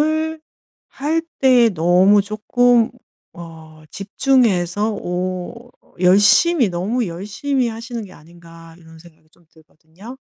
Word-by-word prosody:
'운동을 315 +1 -1 0.5
할 315 +4 -2 0.2
때 250 -3 +4
너무 185 +5 +3
쪼끔 230 +3 +1 0.4
어 160 -2 -13
집중해서 210 -3 0
오 185 +6 -6 0.3
열심히 210 - +4
너무 205 +7 -2
열심히 215 +9 -3
하시는 230 +1 -7
게 185 - -14
아닌가.' 165 0 -16
이런 160 -1 -17
생각이 160 -2 -20
좀 175 - -29
들거든요. 160 - -16
200 Hz, 235 characters per minute, -18 LUFS, 170-245 Hz, 0.5 s, 때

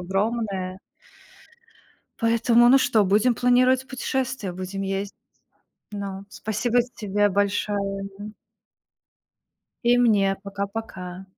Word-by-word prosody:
огромная. 195 -1 -2 1.4
Поэтому, 230 +1 +4
ну 270 - +7
что, 220 -5 +3
будем 215 +6 +3
планировать 255 +2 +3
путешествие, 260 -5 -3
будем 185 +2 -5
ездить. 195 +1 -3 0.8
Ну, 200 -1 -6
спасибо 225 +4 -1 0.2
тебе 205 0 +1
большое, 200 0 -1
мгм. 210 +1 -9 1.5
И 240 +1 +5
мне. 200 -5 +3
Пока-пока. 200 -2 -6
205 Hz, 90 wpm, -24 LUFS, 195-235 Hz, 1.5 s, ну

